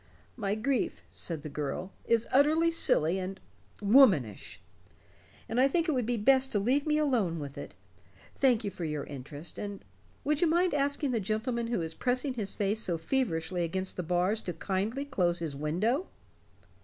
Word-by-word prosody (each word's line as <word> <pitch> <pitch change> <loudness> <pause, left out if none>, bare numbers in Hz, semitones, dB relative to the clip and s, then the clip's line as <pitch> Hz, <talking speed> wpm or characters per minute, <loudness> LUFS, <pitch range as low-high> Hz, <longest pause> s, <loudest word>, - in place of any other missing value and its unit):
"My 205 -3 -1
grief," 250 +3 -1
said 160 -4 -5
the - - -5
girl, 150 +6 -4
"is 230 -1 +2
utterly 310 +5 +4
silly 180 - +2
and 190 +1 -5 0.4
womanish. 200 - +4 0.9
I 250 +4 +3
think 335 +4 +1
it - - +2
would 250 -6 0
be 240 -1 0
best 265 +4 +3
to 205 - +2
leave 265 +9 +1
me 300 0 +3
alone 240 - +1
with 140 -3 -6
it. - - -8 0.6
Thank 250 -4 +3
you 200 - -2
for 180 - -7
your 150 -2 -2
interest. 145 +3 -8
And 200 -1 -6 0.4
would 300 0 +1
you 345 - +5
mind 350 +2 +2
asking 285 -1 0
the 235 - +1
gentleman 225 +3 -1
who 230 -8 -1
is 160 0 -4
pressing 255 - 0
his 215 -5 -3
face 210 +2 0
so 175 -5 -1
feverishly 175 -5 -1
against 185 +3 -3
the - - -2
bars 180 +5 0
to 175 - -4
kindly 200 - -2
close 180 -11 +1
his 160 -4 -4
window?" 200 - 0
215 Hz, 175 wpm, -30 LUFS, 175-265 Hz, 0.9 s, you